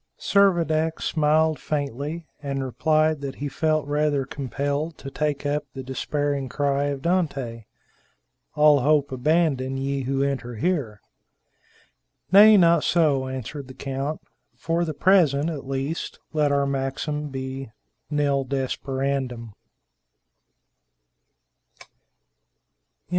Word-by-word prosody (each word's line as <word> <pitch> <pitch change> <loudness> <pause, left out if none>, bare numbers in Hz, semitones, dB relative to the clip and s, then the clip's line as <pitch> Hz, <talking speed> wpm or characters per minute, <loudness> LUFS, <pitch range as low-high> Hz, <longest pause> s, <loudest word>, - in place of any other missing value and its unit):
Servadac 165 -5 +2
smiled 155 -1 +2
faintly, 145 +3 -3 0.2
and 140 -2 -3
replied 155 +3 +1
that 140 -1 -5
he 145 - -4
felt 155 +2 0
rather 145 -1 0
compelled 145 +4 -3
to 135 - -8
take 150 -1 -2
up 145 +1 0
the 135 - -5
despairing 140 +1 -2
cry 140 0 0
of 140 -1 -3
Dante, 140 - -1 0.9
"All 150 -1 +6
hope 145 +1 +2
abandon, 135 -1 +1
ye 135 +1 -2
who 135 +1 0
enter 130 -4 -3
here." 120 - -1 1.3
"Nay, 210 +2 +9
not 170 -3 +5
so," 145 -6 +2
answered 130 +2 -6
the 130 - -11
count; 135 +3 -4 0.4
"for 170 +1 -1
the 155 -3 -4
present 165 -4 +3
at 140 -4 -7
least, 135 +4 -3 0.2
let 150 -2 +2
our 140 0 +2
maxim 140 +2 -2
be 130 -1 -5 0.4
_Nil 140 -2 +1
desperandum! 130 -3 -2
145 Hz, 110 wpm, -24 LUFS, 135-155 Hz, 1.3 s, Nay